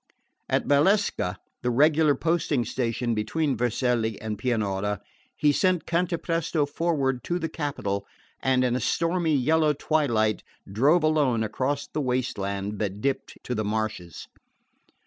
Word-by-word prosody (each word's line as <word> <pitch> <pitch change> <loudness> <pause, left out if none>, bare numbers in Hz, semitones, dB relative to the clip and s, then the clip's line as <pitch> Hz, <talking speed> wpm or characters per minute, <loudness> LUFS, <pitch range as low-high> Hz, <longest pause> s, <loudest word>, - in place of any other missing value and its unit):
At - - +1
Valsecca, 145 - +2 0.2
the 125 - 0
regular 150 +3 +4
posting 155 -5 0
station 120 0 -1
between 135 +7 0
Vercelli 120 -1 0
and 110 -1 -4
Pianura, 105 -4 -1 0.4
he 150 - +3
sent 180 +1 +1
Cantapresto 170 -2 0
forward 140 -5 -1
to 175 - 0
the 165 -2 -2
capital, 140 - -3 0.3
and 130 -1 +2
in 125 -1 +1
a - - 0
stormy 165 +5 +1
yellow 155 +3 +3
twilight 125 -8 +1 0.3
drove 140 - +3
alone 145 -7 +2
across 130 +6 -1
the 155 - -3
waste 125 -4 -1
land 100 +1 -3
that 100 -1 -2
dipped 135 +5 -2
to 125 - -3
the 110 -2 -1
marshes. 105 -6 -3
130 Hz, 135 wpm, -26 LUFS, 110-155 Hz, 0.4 s, regular